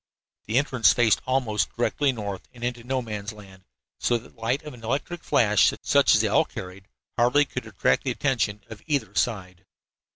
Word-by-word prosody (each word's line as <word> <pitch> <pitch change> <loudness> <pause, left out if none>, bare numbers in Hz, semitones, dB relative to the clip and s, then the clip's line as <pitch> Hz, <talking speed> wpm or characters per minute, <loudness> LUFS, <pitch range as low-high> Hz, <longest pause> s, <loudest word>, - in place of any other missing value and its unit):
The 110 +3 +1
entrance 130 -6 +4
faced 120 -3 +3
almost 125 -6 0
directly 135 +3 +1
north 100 -5 -6
and 120 - -11
into 120 -1 -3
No 130 +1 -2
Man's 105 -1 -5
Land, 95 -3 -15 0.3
so 120 - +2
that 115 - -14
the - - -22
light 125 +6 0
of 150 - -8
an 120 -2 -14
electric 145 +8 -3
flash, 105 -3 +4
such - - +4
as - - +4
they - - +1
all - - +4
carried, 90 +1 -9 0.3
hardly 125 +5 +4
could 125 -4 -6
attract 105 -3 +1
the - - 0
attention 120 -5 -1
of 110 -2 -10
either 145 -3 -1
side. 95 -6 -2
115 Hz, 190 wpm, -25 LUFS, 105-130 Hz, 0.3 s, entrance